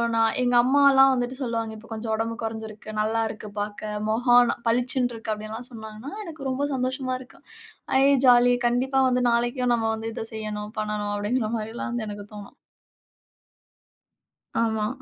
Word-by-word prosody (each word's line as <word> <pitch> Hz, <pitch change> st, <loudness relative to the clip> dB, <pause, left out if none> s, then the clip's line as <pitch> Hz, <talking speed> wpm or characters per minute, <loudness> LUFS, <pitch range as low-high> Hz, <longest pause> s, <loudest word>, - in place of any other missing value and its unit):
நான், 225 Hz, -1 st, +3 dB
எங்க 245 Hz, 0 st, +2 dB
அம்மால்லாம் 270 Hz, 0 st, +6 dB
வந்துட்டு 245 Hz, 0 st, -2 dB
சொல்லுவாங்க. 230 Hz, -3 st, -2 dB
இப்ப 225 Hz, +2 st, -15 dB
கொஞ்சம் 220 Hz, 0 st, -3 dB
உடம்பு 225 Hz, +1 st, -2 dB
குறைஞ்சுருக்கு, 220 Hz, -1 st, -6 dB
நல்லா 225 Hz, +1 st, 0 dB
இருக்கு 215 Hz, -1 st, -8 dB
பார்க்க. 210 Hz, +1 st, -4 dB, 0.2 s
மொகம் 245 Hz, +2 st, +4 dB
ந -, -, -2 dB
பளிச்சுண்டு 245 Hz, +1 st, +1 dB
இருக்கு, 225 Hz, -1 st, -5 dB
அப்பிடியெல்லாம் 215 Hz, +3 st, -7 dB
சொன்னாங்கன்னா, 220 Hz, +3 st, -9 dB
எனக்கு 310 Hz, -6 st, -6 dB
ரொம்ப 275 Hz, +2 st, -1 dB
சந்தோஷமா 255 Hz, 0 st, -1 dB
இருக்கும். 255 Hz, -, -16 dB, 0.6 s
ஐ -, -, +5 dB, 0.2 s
ஜாலி! 245 Hz, 0 st, +6 dB
கண்டிப்பா 265 Hz, +3 st, +1 dB
வந்து 250 Hz, 0 st, +1 dB
நாளைக்கும் 240 Hz, +1 st, +1 dB
நம்ம 225 Hz, -1 st, 0 dB
வந்து 225 Hz, +1 st, -5 dB
இத -, -, -4 dB
செய்யணும், 210 Hz, -1 st, -5 dB
பண்ணணும் 210 Hz, -1 st, -2 dB
அப்பிடிங்கிறமாரி 220 Hz, +1 st, -2 dB
எல்லாம் 240 Hz, -, -4 dB
வந்து 235 Hz, -2 st, -3 dB
எனக்கு 205 Hz, 0 st, -7 dB
தோணும். 205 Hz, -1 st, -10 dB, 2.1 s
ஆமா. 220 Hz, -2 st, 0 dB
230 Hz, 150 wpm, -25 LUFS, 215-250 Hz, 2.1 s, அம்மால்லாம்